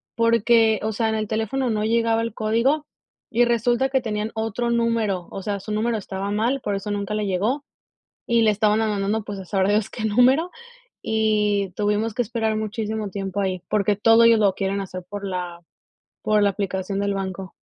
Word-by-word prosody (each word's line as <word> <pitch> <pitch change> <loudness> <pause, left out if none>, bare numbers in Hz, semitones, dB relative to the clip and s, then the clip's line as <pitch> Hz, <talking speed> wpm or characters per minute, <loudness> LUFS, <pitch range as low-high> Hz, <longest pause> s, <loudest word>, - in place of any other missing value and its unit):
porque, 230 -1 +3
o 220 0 -1
sea, 225 +1 0
en 220 - 0
el 215 -1 -2
teléfono 225 +5 -1
no 210 -1 -1
llegaba 230 0 +2
el 230 -1 -3
código. 235 +7 +1 0.5
Y 240 +1 +5
resulta 240 +2 +1
que 265 0 +2
tenían 215 -3 -3
otro 225 +2 -2
número, 230 -6 0
o 195 - -6
sea, 200 +1 -3
su 215 - -8
número 225 +2 0
estaba 195 -1 -5
mal, 235 +6 0
por 205 -3 -2
eso 195 +1 -4
nunca 205 0 -2
le 210 -1 -1
llegó. 215 +10 -1 0.6
Y 235 -1 +3
le 215 - +5
estaban 210 +1 +2
ma 220 - +1
mandando, 210 +1 -1
pues, 205 -1 -6
a 190 - -8
sabrá 190 +1 +1
Dios 210 +1 +1
qué 220 - -5
número, 255 +10 +3 0.5
y 210 -3 +1
tuvimos 210 +2 0
que 245 - 0
esperar 225 -1 -1
muchísimo 215 -1 -3
tiempo 195 +1 -3
ahí, 185 -2 -2
porque 205 0 +2
todo 225 +3 +5
ellos 230 -1 +6
lo 200 -3 +3
quieren 195 0 -1
hacer 185 -1 -7
por 205 0 -5
la 180 -2 -4 0.6
por 210 -1 +2
la 200 - +4
aplicación 195 0 -3
del 200 0 0
banco. 190 -1 -5
215 Hz, 195 wpm, -23 LUFS, 200-230 Hz, 0.6 s, ellos